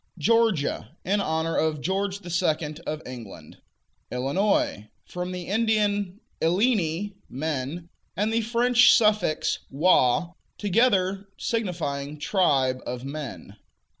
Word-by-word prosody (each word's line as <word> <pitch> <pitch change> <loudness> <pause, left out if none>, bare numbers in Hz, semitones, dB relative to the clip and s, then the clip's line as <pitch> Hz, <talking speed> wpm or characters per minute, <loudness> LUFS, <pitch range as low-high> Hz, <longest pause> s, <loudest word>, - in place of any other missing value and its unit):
Georgia 220 - +1
In 200 +2 +1
honor 160 -2 -1
of 155 -1 +1
George 195 +5 -2
II. 165 -3 0
of 155 +1 -3
England. 110 -11 -10 0.5
Illinois 135 - 0 0.2
From 180 0 -5
the 180 -1 -5
Indian 205 -2 0 0.2
"illini," 190 0 +1 0.2
men, 150 +3 -4 0.3
and 210 +3 0
the 230 - +2
French 240 +2 +5
suffix 210 -8 +2
"ois," 155 +1 +3 0.2
together 200 -2 +2
signifying 150 -10 -3
"tribe 140 -7 +2
of 125 +1 -5
men." 140 - -7
175 Hz, 105 wpm, -25 LUFS, 145-205 Hz, 0.5 s, French